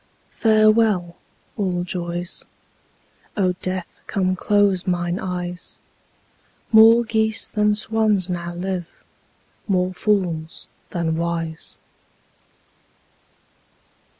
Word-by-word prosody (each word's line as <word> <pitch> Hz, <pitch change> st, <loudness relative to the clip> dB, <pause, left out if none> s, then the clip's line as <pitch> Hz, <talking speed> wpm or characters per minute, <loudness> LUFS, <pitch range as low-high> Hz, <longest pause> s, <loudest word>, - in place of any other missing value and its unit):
Farewell, 215 Hz, -5 st, +3 dB, 0.4 s
all 180 Hz, -3 st, -1 dB
joys; 175 Hz, 0 st, -3 dB, 0.9 s
O 185 Hz, -3 st, +2 dB
Death, 185 Hz, -1 st, -4 dB
come 185 Hz, -3 st, 0 dB
close 200 Hz, -1 st, +2 dB
mine 175 Hz, 0 st, -1 dB
eyes; 180 Hz, -1 st, -5 dB, 0.9 s
More 225 Hz, +1 st, +8 dB
geese 220 Hz, -1 st, +1 dB
than 210 Hz, -1 st, +1 dB
swans 215 Hz, -3 st, +1 dB
now 175 Hz, -1 st, -4 dB
live, 180 Hz, -1 st, -3 dB, 0.8 s
more 185 Hz, -2 st, +1 dB
fools 175 Hz, -6 st, -1 dB, 0.2 s
than 165 Hz, -2 st, -1 dB
wise. 165 Hz, -1 st, -3 dB
185 Hz, 80 wpm, -22 LUFS, 175-210 Hz, 0.9 s, More